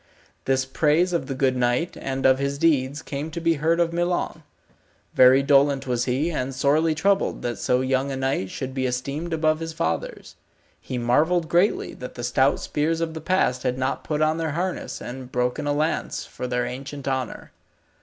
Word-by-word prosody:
This 130 0 +1
praise 155 +6 +2
of 170 - -1
the 135 - -3
good 130 -1 +1
knight, 125 +7 0
and 135 0 -3
of 130 0 +5
his 140 0 -1
deeds, 145 -2 +1
came 145 +3 -4
to 160 - -5
be 165 0 +2
heard 165 +2 +2
of 170 -1 +1
Milon. 175 +1 -1 0.7
Very 130 +2 +6
dolent 140 -1 +3
was 125 -2 0
he 135 +7 0
and 135 -4 -3
sorely 155 +4 +2
troubled 195 +5 +1
that 120 -4 -3
so 125 0 +1
young 130 +1 0
a - - -2
knight 130 -8 -1
should 130 +5 -5
be 130 -1 -1
esteemed 140 +7 -3
above 155 -1 +1
his 165 0 -5
fathers. 80 - -3 0.5
He 130 - -5
marvelled 160 +8 +2
greatly 175 +5 +1
that 125 - -9
the 120 - -6
stout 130 +3 +2
spears 160 +2 -1
of 165 -1 -2
the 160 - -6
past 155 -7 +1
had 125 -1 -1
not 130 +1 -2
put 155 0 0
on 155 +1 +2
their 160 -3 -2
harness 180 +2 -3
and 125 +1 -8
broken 125 +3 -1
a - - +2
lance 155 +3 -1
for 125 - -6
their 125 0 -1
ancient 135 +2 -7
honour. 130 -3 -3
140 Hz, 195 wpm, -24 LUFS, 130-160 Hz, 0.7 s, Very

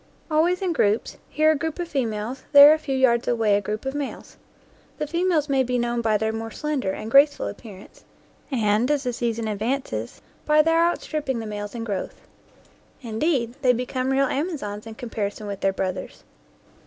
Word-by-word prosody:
Always 345 +5 +2
in 360 -2 0
groups, 210 -6 0
here 310 +1 +3
a - - +2
group 315 +2 -3
of 350 -1 -3
females, 245 -3 -3
there 285 +1 +10
a 315 - -1
few 275 -3 -2
yards 240 -2 +3
away 225 -4 +2
a 205 - +1
group 210 +4 -4
of 270 - -2
males. 290 -1 -6 0.6
The - - -2
females 335 -1 0
may 270 -2 +2
be 250 -1 0
known 240 0 -1
by 220 -2 +2
their 220 +1 -1
more 225 0 -4
slender 280 -3 -2
and 215 +3 -6
graceful 285 +2 +5
appearance 205 -4 -11 0.5
and, 225 -2 +1
as 290 -2 +1
the 250 -2 -2
season 230 -1 -2
advances, 215 - -3 0.2
by 305 0 +4
their 325 +1 +3
outstripping 305 -6 -1
the 225 - -5
males 205 0 -6
in 230 - -4
growth. 200 -4 -4 0.8
Indeed, 235 +1 -1
they 250 -1 +4
become 255 +2 -2
real 270 +1 +3
amazons 265 - -3
in 220 - -8
comparison 215 -3 -4
with 200 -1 -5
their 195 - +1
brothers. 185 -1 -5
245 Hz, 180 wpm, -24 LUFS, 215-290 Hz, 0.8 s, there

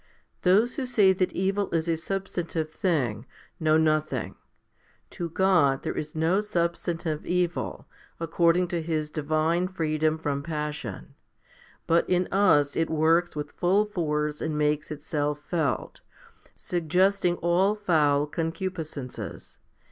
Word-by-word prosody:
Those 210 +9 +3
who 265 -3 -2
say 205 -6 +5
that 185 0 0
evil 195 +2 0
is 165 0 -1
a 165 - +2
substantive 170 -3 -3
thing, 130 - -1 0.3
know 155 -1 +3
nothing. 155 -1 0 0.8
To 170 -1 -4
God 165 -7 +3
there - - -3
is 150 0 -5
no 165 +5 +2
substantive 170 -4 -2
evil, 180 -1 -1 0.3
according 170 +2 +2
to 175 -1 -1
His 155 -2 -2
divine 155 +4 0
freedom 155 -3 0
from 145 -3 -2
passion; 150 - -5 0.7
but 165 +1 +2
in 180 0 +2
us 160 -8 +3
it 165 0 0
works 165 +2 +2
with 150 -1 -4
full 195 +4 +2
force 150 -6 -2
and 155 -1 -2
makes 150 0 0
itself 150 -1 -2
felt, 155 -4 -2 0.5
suggesting 180 +2 +1
all 180 +5 +2
foul 150 -8 +2
con 165 +2 -2
cupiscences. 160 -7 -6
165 Hz, 125 wpm, -26 LUFS, 150-180 Hz, 0.8 s, say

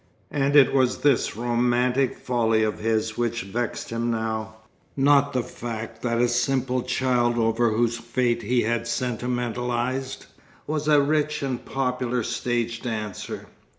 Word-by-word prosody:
And 140 0 +1
it 140 -3 +7
was 130 -2 +3
this 140 -7 +2
romantic 120 +2 +1
folly 115 -3 +1
of 110 - -1
his 110 0 -1
which 120 0 -1
vexed 115 +5 -4
him 115 +1 -1
now; 110 -1 -2 0.4
not 140 0 +4
the 130 -3 0
fact 115 -2 -7
that 115 -1 0
a 120 - +4
simple 125 +1 0
child 125 -1 +1
over 115 +1 +2
whose 115 +1 +1
fate 120 0 0
he 120 +3 +1
had 115 +1 -1
sentimentalized, 125 +2 -2 0.4
was 150 0 -2
a 150 -2 +5
rich 150 0 0
and 130 -3 -3
popular 125 -2 -1
stage 115 0 -2
dancer. 110 -5 -5
120 Hz, 140 wpm, -25 LUFS, 115-130 Hz, 0.4 s, it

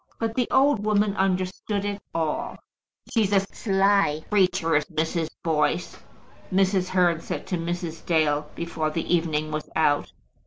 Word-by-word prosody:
But 225 -1 -2
the 245 0 0
old 270 -6 +3
woman 210 -1 +2
understood 190 +2 -1
it 200 0 -3
all. 160 -2 -2 0.6
"She's 215 -4 +2
a 200 - +5
sly 195 -5 +1
creature, 180 -5 +2
is 150 0 +2
Mrs. 160 +1 -2
Boyce," 160 -2 0 0.6
Mrs. 190 -1 +2
Hearn 180 -3 +2
said - - -5
to 180 - -2
Mrs. 170 -1 -4
Dale, 150 -3 +1
before 165 -2 -2
the 165 +3 -2
evening 155 -3 0
was 155 0 -4
out. 145 -2 +2
180 Hz, 145 wpm, -25 LUFS, 160-200 Hz, 0.6 s, a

